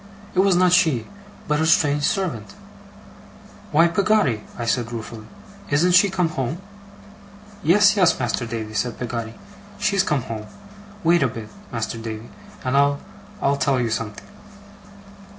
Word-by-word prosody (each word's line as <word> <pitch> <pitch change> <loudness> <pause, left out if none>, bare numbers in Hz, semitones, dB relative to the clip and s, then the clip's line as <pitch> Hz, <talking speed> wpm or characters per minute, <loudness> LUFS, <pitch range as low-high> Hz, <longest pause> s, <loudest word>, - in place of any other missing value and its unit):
It 185 - 0
was 190 -1 +4
not 180 0 +4
she, 160 -11 +3 0.4
but 150 0 +1
a - - +2
strange 145 -2 +3
servant. 155 - -2 1.2
'Why, 165 +3 +5
Peggotty!' 180 - +2 0.2
I 120 - -3
said, 120 0 -1
ruefully, 115 -1 -7 0.4
'isn't 155 +6 +3
she 185 +3 +6
come 180 -3 0
home?' 135 +1 -3 1.0
'Yes, 205 +4 +5
yes, 180 -5 +3
Master 120 -1 -1
Davy,' 110 -1 -5
said 120 +2 -2
Peggotty. 115 -2 -4 0.4
'She's 200 -1 +2
come 150 -9 0
home. 110 -2 -6 0.6
Wait 170 0 +4
a 140 - +3
bit, 115 -2 -8 0.2
Master 115 -1 -3
Davy, 110 0 -7 0.3
and 130 +1 0
I'll 140 0 +3 0.4
I'll 140 0 +2
tell 135 -1 +1
you 120 -2 -1
something. 110 -2 -4
140 Hz, 145 wpm, -22 LUFS, 115-175 Hz, 1.2 s, she